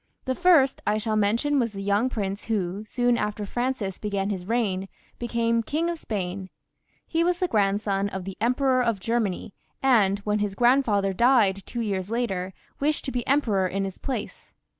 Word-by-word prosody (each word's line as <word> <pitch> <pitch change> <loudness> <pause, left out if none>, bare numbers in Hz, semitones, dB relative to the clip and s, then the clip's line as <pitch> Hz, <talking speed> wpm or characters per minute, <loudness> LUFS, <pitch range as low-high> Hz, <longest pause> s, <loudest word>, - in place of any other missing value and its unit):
The 260 - 0
first 315 -4 +4
I 210 +1 +2
shall 215 0 -1
mention 230 +8 +2
was 230 -3 0
the 195 0 -5
young 205 +5 +2
prince 200 -4 -3
who, 200 -2 -2
sdon 245 +1 +1
after 210 0 -2
Francis 240 -4 -2
began 200 -1 -2
his 185 -2 -5
reign, 200 -5 0 0.3
became 230 -1 +1
King 320 +9 -1
of 335 - -6
Spain. 190 -4 -4 0.6
He 330 0 0
was 350 0 +1
the 365 - 0
grandson 200 - +1
of 190 -2 -6
the 195 -1 -6
Emperor 255 +2 +2
of 230 -4 0
Germany, 215 -2 -1 0.3
and 215 -7 +4
when 210 0 0
his 205 -1 -2
grandfather 230 -5 +3
died 220 -3 +4
two 240 - -4
years 195 -3 -2
later, 195 -6 -2 0.3
wished 300 +2 0
to 265 - -2
be 245 -2 -3
emperor 220 -9 +2
in 195 +2 -2
his 190 -1 -7
place. 250 -6 -6
215 Hz, 180 wpm, -25 LUFS, 195-250 Hz, 0.6 s, first